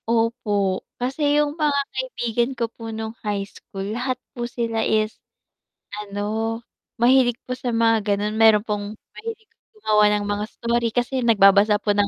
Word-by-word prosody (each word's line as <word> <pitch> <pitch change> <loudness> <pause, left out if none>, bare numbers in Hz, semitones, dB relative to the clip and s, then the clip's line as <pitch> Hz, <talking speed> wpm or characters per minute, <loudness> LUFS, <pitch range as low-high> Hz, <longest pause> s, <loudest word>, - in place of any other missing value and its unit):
Opo. 210 -4 +1 0.2
Kasi 285 +4 +1
yung 295 -1 +2
mga 295 -3 +2
kaibigan 245 -2 -1
ko 235 - +1
po 225 0 -9
nung 220 0 -5
high 205 -2 -2
school, 195 -1 -9
lahat 250 +2 -2 0.2
po 240 -1 -4
sila 230 -2 -2
is 215 0 +1 0.9
ano, 215 +3 -2 0.4
mahilig 245 0 +4
po - - -8
sa 245 -1 -3
mga 225 -1 +4 0.2
ganon, 210 +1 -2
meron 220 -2 +6
pong 210 -2 -3 0.3
mahilig 445 -1 -7 0.3
gumawa 215 - +3
ng 205 0 -2
mga 205 0 -1
story 235 +1 -1
kasi 245 +2 0
nagbabasa 210 -3 +5
po 205 - +2
ng 205 0 +2
225 Hz, 155 wpm, -23 LUFS, 210-245 Hz, 0.9 s, meron